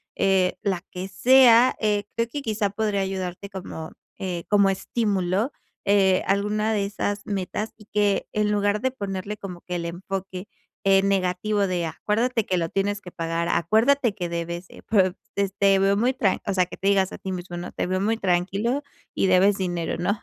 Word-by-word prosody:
eh, 190 -2 +2
la 195 -3 0
que 185 +1 -6
sea. 245 +4 +6
Eh, 210 -1 +1
creo 230 0 0
que 290 - -4
quizá 215 -4 -1
podría 205 -1 -1
ayudarte 190 0 -4
como, 180 -4 -7 0.3
eh, 180 -3 -4
como 200 -1 +5
estímulo, 195 +2 0 0.3
eh, 195 -2 +3
alguna 210 +2 +1
de 205 -2 +1
esas 205 0 -3
metas 200 +2 -3
y 210 -1 -18
que 205 -1 +1
en 210 0 +1
lugar 205 0 +1
de 260 +3 0
ponerle 200 -3 -4
como 195 -4 -8
que 180 - -5
el 170 - -2
enfoque, 185 +2 -5 0.4
eh, 195 -1 +5
negativo 195 +1 +1
de 180 -2 -1
acuérdate 225 +6 0
que 185 - 0
lo 165 -1 -1
tienes 200 +2 -1
que 180 - -10
pagar, 165 0 -2
acuérdate 225 - +2
que 175 -4 -3
debes, 170 +1 -4
eh, - - -14
pues, 190 -4 +3 0.2
este, 200 -1 0
te 195 -1 +5
veo 195 +1 +3
muy 245 +5 +2
tran 205 -7 +1
o 200 - -1
sea, 185 -1 +3
que - - -10
te 195 - -2
digas 195 -2 +3
a - - -7
ti 190 - -6
mismo, 175 -1 -6
¿no? 175 +1 -6
"Te - - -2
veo 185 +1 0
muy 215 +4 +1
tranquilo 195 +8 0 0.3
y - - +1
debes 190 +2 +4
dinero", 175 -3 -2
¿no?, 200 +5 -1
195 Hz, 195 wpm, -24 LUFS, 185-210 Hz, 0.4 s, sea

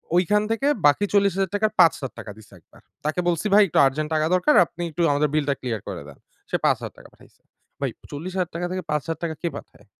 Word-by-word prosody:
ওইখান 200 +4 +3
থেকে 225 +5 0 0.2
বাকি 175 +8 +3
৪০০০০ 195 -2 +2
টাকার 215 +1 +1
৫০০০ 145 -5 +3
টাকা 110 -2 -8
দিছে 105 -2 -17
একবার। - - -22 0.2
তাকে 155 +3 -1
বলছি 170 +2 0
ভাই, 210 - +8
"একটু 160 - +1
আর্জেন্ট 150 +3 -1
টাকা 155 - +2
দরকার। 185 +12 +3
আপনি 175 +1 -8
একটু 165 +2 -4
আমাদের 145 +1 +1
বিলটা 145 -2 +1
ক্লিয়ার 115 -5 -3
করে - - -5
দেন।" 70 - -13 0.3
সে - - -1
৫০০০ - - 0
টাকা - - -15
পাঠাইছে। - - -22 0.4
ভাই - - -1 0.2
৪০০০০ 180 +4 -4
টাকা 175 +1 -2
থেকে 185 0 -3
৫০০০ 150 +2 -2
টাকা 160 -2 -2
কে 170 - -1
পাঠায়? 105 - -14
165 Hz, 210 wpm, -23 LUFS, 145-185 Hz, 0.4 s, ভাই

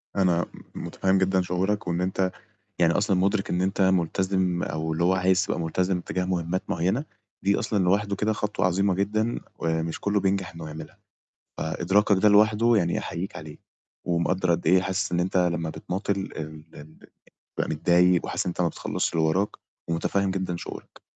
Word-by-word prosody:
أنا 90 -3 +2 0.3
م - - -5
متفهّم 95 0 +1
جدًا 95 0 +2
شعورك، 95 +3 -1
وإن 85 +1 0
أنت 95 0 0 0.5
يعني 85 -1 +4
أصلًا 100 0 +1
مدرِك 95 +2 +1
إن 90 +1 0
أنت 95 +1 -1
ملتزم 95 0 +1
أو 80 +1 -2
اللي 85 +2 0
هو 95 +1 +4
عايز 95 +1 +3
تبقى - - -2
ملتزم 90 +2 0
تجاه 90 +1 -2
مهمات 90 0 -1
معيّنة، 95 - 0 0.4
دي 100 +1 +2
أصلًا 105 -4 0
لوحده 100 +2 +1
كده 110 +2 +1
خطوة 105 -3 -1
عظيمة 95 +1 +2
جدًا 110 +4 0 0.2
ومش 80 0 -2
كله 100 0 +1
بينجح 95 -3 0
إنه 85 -1 -7
يعملها، 80 +1 -9 0.6
فإدراكك 95 +5 +2
ده 105 - +7
لوحده 110 +3 +5
يعني 85 -3 +1
أحييك 90 +4 -5
عليه، 75 -1 -9 0.5
ومقدر 90 +1 0
قدّ 85 +1 0
إيه 90 0 +5
حاسس 95 -1 -2
إن 85 - +2
أنت 95 +1 -1
لمّا 85 -3 +1
بتماطل 90 +6 -3
ال - - -7
ال- 80 0 -7 0.2
ال 80 +1 -14 0.6
بتبقى - - -1
متضايق 90 +3 +3
وحاسس - - -2
إن - - 0
أنت 90 - -2
ما 85 - +3
بتخلصش - - -2
اللي 80 -1 +2
وراك 95 +6 +2 0.4
ومتفهم 95 +3 0
جدًا 95 -2 -2
شعورك، - - -9
90 Hz, 180 wpm, -26 LUFS, 85-100 Hz, 0.6 s, ده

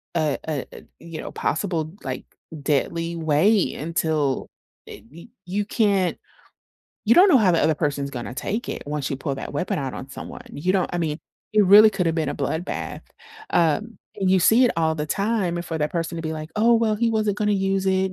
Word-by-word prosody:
a 155 -4 +1
a 150 -4 -2
a, - - -12 0.2
you 165 -2 -8
know, - - -7
possible, 160 -2 -2
like, 130 -2 -5 0.4
deadly 165 +4 -1
way 165 +6 +2
until, 155 -3 -1 0.4
eh, - - -10
y 170 +6 -13 0.2
you 200 +3 -2
can't 200 -5 +1 0.9
you 230 - +6
don't 375 +3 +7
know 275 - +7
how 205 -5 +4
the 165 - +2
other 160 - +3
person's 145 -2 -2
gonna 120 -2 -6
take 210 - -3
it - - -4
once 145 -2 -2
you 135 - -3
pull 140 +1 -3
that - - -6
weapon 185 - -1
out 135 -2 -4
on 135 - -8
someone, - - -8
you 175 +6 -1
don't 190 -2 0
I 175 - -1
mean, 155 -2 -2 0.4
it 210 -1 +5
really 205 +3 +9
coulda 180 -5 0
been 160 -3 -1
a - - -2
bloodbath, 160 +5 -3 0.5
um, 175 +7 +1 0.2
and 190 -1 +1
you 190 0 +4
see 225 +8 +5
it 245 - +3
all 160 -1 +1
the 150 0 -3
time 195 -2 -1
for 165 -1 -4
that 150 0 -1
person 170 -1 -2
to 165 - -4
be 160 -1 -3
like, 155 0 -7
"Oh, 230 +2 +4
well, 225 -1 +2
he 230 +2 +1
wasn't 215 -2 0
gonna 210 -1 +1
use 195 -1 0
it,. 190 0 +1
170 Hz, 210 wpm, -23 LUFS, 155-200 Hz, 0.9 s, really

